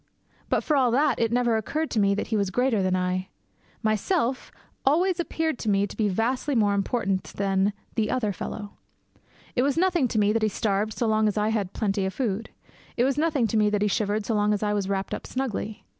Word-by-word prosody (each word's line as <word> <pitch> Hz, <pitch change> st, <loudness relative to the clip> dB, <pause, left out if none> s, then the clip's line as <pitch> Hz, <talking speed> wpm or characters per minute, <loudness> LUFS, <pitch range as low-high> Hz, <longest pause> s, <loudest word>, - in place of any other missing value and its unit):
But -, -, +1 dB
for 305 Hz, -, +1 dB
all 260 Hz, -3 st, +4 dB
that, 280 Hz, +5 st, +2 dB
it 230 Hz, -1 st, +1 dB
never 240 Hz, -2 st, +2 dB
occurred 300 Hz, +9 st, -2 dB
to 225 Hz, -, +1 dB
me 200 Hz, -1 st, +3 dB
that 205 Hz, -, -3 dB
he 225 Hz, -, 0 dB
was 200 Hz, -2 st, +1 dB
greater 245 Hz, +1 st, +1 dB
than 185 Hz, -1 st, +1 dB
I. 185 Hz, 0 st, -1 dB, 0.6 s
Myself 235 Hz, -, 0 dB, 0.3 s
always 350 Hz, +6 st, +2 dB
appeared 320 Hz, -4 st, -1 dB
to 220 Hz, -, -2 dB
me 200 Hz, 0 st, +3 dB
to 205 Hz, -, -9 dB
be 210 Hz, -2 st, +1 dB
vastly 250 Hz, +8 st, 0 dB
more 205 Hz, -3 st, +3 dB
important 195 Hz, -1 st, 0 dB
than 195 Hz, 0 st, +1 dB, 0.2 s
The 215 Hz, -2 st, 0 dB
Other 215 Hz, -5 st, 0 dB
Fellow. 205 Hz, +4 st, -6 dB, 0.8 s
It 245 Hz, -, +3 dB
was 280 Hz, +3 st, +1 dB
nothing 355 Hz, -6 st, +3 dB
to 225 Hz, -, -3 dB
me 210 Hz, 0 st, +3 dB
that 225 Hz, -, +1 dB
he 215 Hz, -, +2 dB
starved 210 Hz, +1 st, -1 dB
so 235 Hz, -, -1 dB
long 215 Hz, -1 st, +2 dB
as 210 Hz, -, -1 dB
I 210 Hz, +1 st, +2 dB
had 205 Hz, -4 st, -1 dB
plenty 200 Hz, -2 st, 0 dB
of 190 Hz, -, -5 dB
food. 225 Hz, -4 st, -2 dB, 0.5 s
It 240 Hz, -, +3 dB
was 270 Hz, +1 st, +2 dB
nothing 305 Hz, -6 st, +2 dB
to 220 Hz, -, 0 dB
me 210 Hz, -1 st, +4 dB
that 210 Hz, 0 st, 0 dB
he -, -, +3 dB
shivered 210 Hz, +1 st, 0 dB
so 230 Hz, -, -1 dB
long 210 Hz, 0 st, +2 dB
as 205 Hz, -, -4 dB
I 210 Hz, 0 st, +1 dB
was 200 Hz, -2 st, -1 dB
wrapped 195 Hz, -1 st, -2 dB
up -, -, -5 dB
snugly. 225 Hz, -5 st, -4 dB
215 Hz, 230 wpm, -26 LUFS, 200-250 Hz, 0.8 s, all